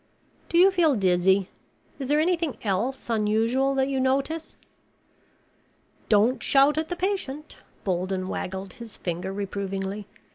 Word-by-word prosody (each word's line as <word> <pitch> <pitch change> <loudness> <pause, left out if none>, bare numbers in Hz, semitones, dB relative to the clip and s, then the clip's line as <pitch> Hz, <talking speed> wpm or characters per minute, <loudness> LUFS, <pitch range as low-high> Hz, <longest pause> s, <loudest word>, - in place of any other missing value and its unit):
"Do 335 - +1
you 375 +3 +7
feel 335 -6 +3
dizzy? 190 -1 +3 0.5
Is 270 - -4
there 295 +2 +3
anything 335 -3 0
else 225 +7 -1
unusual 230 +5 +1
that 265 0 +2
you 270 -1 -1
notice?" 275 +5 -1 1.5
"Don't 220 +4 +3
shout 275 +2 +4
at 315 - -3
the 355 - -2
patient." 350 -6 -3 0.3
Bolden 185 0 -1
waggled 190 0 -5
his 230 -3 -10
finger 175 +2 -4
reprovingly. 195 0 -4
235 Hz, 130 wpm, -25 LUFS, 195-285 Hz, 1.5 s, you